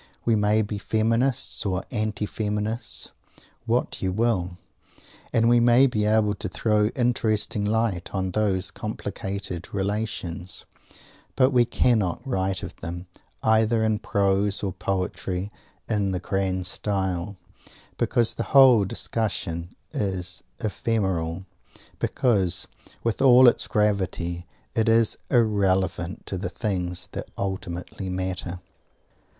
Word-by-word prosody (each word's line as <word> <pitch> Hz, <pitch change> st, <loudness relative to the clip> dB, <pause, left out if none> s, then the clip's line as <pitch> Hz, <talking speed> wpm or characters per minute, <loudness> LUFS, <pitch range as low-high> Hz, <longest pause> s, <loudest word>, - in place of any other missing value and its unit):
We 115 Hz, -, +4 dB
may 105 Hz, +1 st, +3 dB
be 105 Hz, 0 st, -4 dB
Feminists 115 Hz, +5 st, +1 dB
or 95 Hz, -2 st, -1 dB
Anti 110 Hz, -3 st, -1 dB
Feminists 105 Hz, +2 st, -3 dB, 0.6 s
what -, -, 0 dB
you 95 Hz, -, 0 dB
will 95 Hz, -4 st, 0 dB, 0.7 s
and 115 Hz, 0 st, +3 dB
we 120 Hz, 0 st, +5 dB
may 120 Hz, +3 st, +6 dB
be 110 Hz, -5 st, +1 dB
able 105 Hz, -1 st, +3 dB
to 100 Hz, -, -5 dB
throw 105 Hz, -2 st, +2 dB
interesting 110 Hz, -4 st, +1 dB
light 105 Hz, -4 st, 0 dB
on 95 Hz, -1 st, -2 dB
these 95 Hz, -3 st, +1 dB
complicated 100 Hz, -2 st, -5 dB
relations, 100 Hz, -3 st, -3 dB, 0.7 s
but 130 Hz, +1 st, +4 dB
we 125 Hz, -2 st, +4 dB
cannot 115 Hz, -5 st, +1 dB
write 95 Hz, -7 st, -1 dB
of -, -, -7 dB
them, 85 Hz, +2 st, -6 dB, 0.4 s
either 110 Hz, +1 st, +3 dB
in 110 Hz, -1 st, +1 dB
prose 100 Hz, 0 st, +1 dB
or 95 Hz, -2 st, -1 dB
poetry, 95 Hz, +1 st, -2 dB, 0.4 s
in 100 Hz, -3 st, 0 dB
the 90 Hz, -, -1 dB
grand 95 Hz, -1 st, -1 dB
style, 95 Hz, -1 st, -1 dB, 0.6 s
because 120 Hz, -2 st, +2 dB
the -, -, -3 dB
whole 125 Hz, -6 st, +8 dB
discussion 90 Hz, -5 st, -3 dB, 0.2 s
is 95 Hz, -2 st, -2 dB, 0.2 s
ephemeral; 95 Hz, -5 st, -1 dB, 0.5 s
because, 105 Hz, -10 st, +1 dB, 0.4 s
with 115 Hz, -2 st, -1 dB
all 130 Hz, -1 st, +8 dB
its 120 Hz, -, +4 dB
gravity, 95 Hz, -4 st, 0 dB, 0.3 s
it 115 Hz, 0 st, +2 dB
is 115 Hz, -1 st, +4 dB
irrelevant 95 Hz, -6 st, +1 dB
to 95 Hz, -, -4 dB
the 100 Hz, -, -3 dB
things 90 Hz, -4 st, -3 dB
that -, -, -6 dB
ultimately 95 Hz, -1 st, -4 dB
matter! 90 Hz, -1 st, -3 dB
100 Hz, 120 wpm, -25 LUFS, 95-110 Hz, 0.7 s, whole